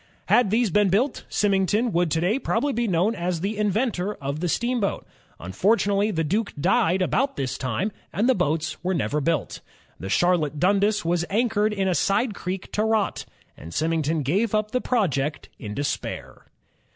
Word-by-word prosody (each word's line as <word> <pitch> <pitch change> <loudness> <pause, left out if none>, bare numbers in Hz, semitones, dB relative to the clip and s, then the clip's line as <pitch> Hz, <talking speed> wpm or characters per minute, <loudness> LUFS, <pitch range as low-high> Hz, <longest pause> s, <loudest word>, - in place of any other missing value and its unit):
Had 245 -5 +4
these 225 0 +2
been 205 +2 +3
built, 240 +9 0
Symington 205 +3 +1
would 175 -1 +1
to 160 - 0
day 200 +9 +1
probably 285 0 0
be 235 +1 0
known 185 +4 +2
as 175 -4 -2
the 200 +4 -2
inventor 210 -1 0
of 140 +2 -4
the 175 +1 -1
steamboat. 235 0 -1 0.3
Unfortimately 200 - +1
the 165 -6 -1
Duke 205 +8 -1
died 190 +1 +2
about 270 +9 0
this 130 -2 -2
time, 135 - -2 0.2
and 205 +8 0
the 260 - +5
boats 155 - -1
were 185 +1 0
never 150 -1 -1
built. 165 +1 -1 0.4
The 95 - -6
Charlotte 155 - +2
Dundas 200 +3 +2
was 170 0 +1
anchored 215 0 +1
in 195 -2 -1
a 185 - +2
side 210 +6 +1
creek 185 -1 -5
to 210 - 0
rot, 220 -2 0 0.3
and 80 - -11
Symington 160 -1 0
gave 195 - +1
up 215 0 0
the 250 - 0
project 155 - -1
in 105 -5 -6
despair. 145 0 -4
195 Hz, 175 wpm, -24 LUFS, 165-215 Hz, 0.4 s, the